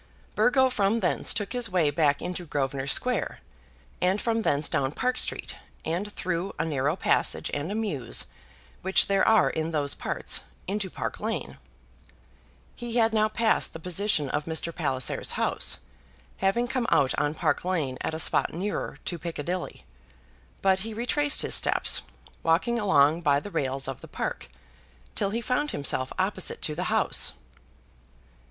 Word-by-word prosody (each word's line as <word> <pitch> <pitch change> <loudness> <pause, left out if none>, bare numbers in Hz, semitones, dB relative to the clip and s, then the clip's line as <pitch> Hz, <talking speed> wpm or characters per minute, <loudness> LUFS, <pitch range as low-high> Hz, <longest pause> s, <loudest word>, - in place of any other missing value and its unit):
Burgo 260 +1 +4
from 210 0 +2
thence 180 - +2
took 205 +1 -1
his 245 -3 0
way 170 -6 +2
back 145 -1 +2
into 180 0 -4
Grosvenor 135 -2 -2
Square, - - +1 0.6
and 185 +3 +2
from 230 0 0
thence 145 -7 +2
down 135 +1 0
Park 250 +6 0
Street, - - -1 0.3
and 180 +6 -2
through 185 0 -3
a - - 0
narrow 145 0 0
passage - - +1
and 145 +6 -2
a - - -2
mews 160 - -1 0.6
which 190 - +4
there 195 -1 +2
are 220 -3 +5
in 160 0 -2
those 145 -3 0
parts, - - 0 0.2
into 195 0 -2
Park - - -5
Lane. - - -4 1.2
He 240 -1 -6
had 225 -2 +3
now 215 0 +3
passed 225 0 +2
the 165 - -7
position 180 -2 +1
of 150 - -1
Mr. 165 +1 -1
Palliser's 130 -6 0
house, - - +1 0.6
having 195 +6 +1
come 250 -2 -1
out 130 - +3
on 145 +1 0
Park 155 -2 0
Lane 155 -9 -1
at 160 - -2
a - - -4
spot - - +2
nearer 195 +5 -3
to 175 - -2
Piccadilly; 170 +2 -4 0.8
but 190 -1 +4
he 220 +2 -5
retraced 285 +5 +1
his - - 0
steps, - - +4 0.4
walking 185 +9 +2
along 160 -6 +4
by 145 -3 +3
the 205 - -9
rails 135 -3 -1
of 135 -2 -5
the - - -10
Park, - - -4 0.6
till 200 - 0
he 230 +4 -2
found 265 +5 0
himself 130 - -1
opposite 185 0 -1
to 155 - 0
the 180 +4 -3
house. - - +1
180 Hz, 160 wpm, -27 LUFS, 150-215 Hz, 1.2 s, are